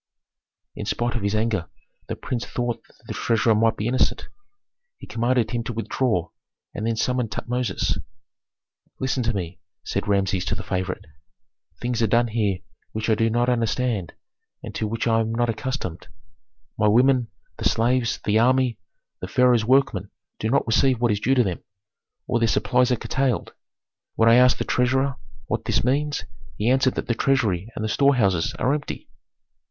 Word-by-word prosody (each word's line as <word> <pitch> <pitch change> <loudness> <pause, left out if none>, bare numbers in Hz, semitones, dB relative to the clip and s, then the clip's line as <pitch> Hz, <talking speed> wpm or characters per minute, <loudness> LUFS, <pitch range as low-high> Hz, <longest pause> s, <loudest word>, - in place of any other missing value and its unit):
In - - -6
spite 120 -1 -1
of 120 - -1
his 100 +1 0
anger 110 -5 0 0.4
the - - -3
prince 120 -2 -4
thought 120 -2 -3
that - - -26
the - - -5
treasurer 115 -1 +2
might 110 +1 +2
be 105 - -3
innocent. 130 +2 0 0.7
He - - -11
commanded 120 -1 0
him 120 -1 -1
to 120 - -3
withdraw, 110 -5 -1 0.4
and 110 - -3
then 115 - 0
summoned 125 0 0
Tutmosis. 120 -1 -1 1.0
"Listen 130 0 0
to 115 -1 +1
me," 90 -2 -4 0.2
said - - -3
Rameses 95 -2 +1
to - - -1
the 110 - -6
favorite, 95 -2 -3 0.7
"things 120 -1 -1
are 115 - +3
done 120 +2 +2
here 105 -5 0 0.3
which 110 +1 -1
I - - +6
do 115 +1 +2
not 120 +2 +1
understand, 115 -5 0 0.5
and - - -7
to 110 - -2
which 115 +2 -2
I 115 -1 +3
am 115 0 -1
not 120 0 +1
accustomed. 110 -7 -5 0.7
My 105 - +4
women, 125 +3 +4 0.3
the - - -5
slaves, 120 +1 +1
the 105 +1 +2
army, 130 0 +2 0.4
the - - -5
pharaoh's 125 -3 +3
workmen 115 -6 +2 0.3
do 110 - -1
not 135 - +2
receive 125 +2 +3
what 120 -2 +2
is 105 - 0
due 130 +5 +2
them, 100 -9 +1 0.6
or 120 -1 0
their 115 - +3
supplies 125 +3 +2
are - - +4
curtailed. 130 +1 -1 0.6
When 115 0 +4
I - - +7
asked 125 +1 +6
the - - -1
treasurer 130 +2 +1 0.3
what - - -3
this - - +1
means, 145 +4 0 0.3
he 110 +4 +2
answered 130 -1 +3
that - - -2
the 120 - 0
treasury 115 -7 +1
and 110 - -3
the - - 0
storehouses 110 - +2
are 135 - +1
empty." 145 -1 -4
115 Hz, 175 wpm, -24 LUFS, 110-125 Hz, 1.0 s, I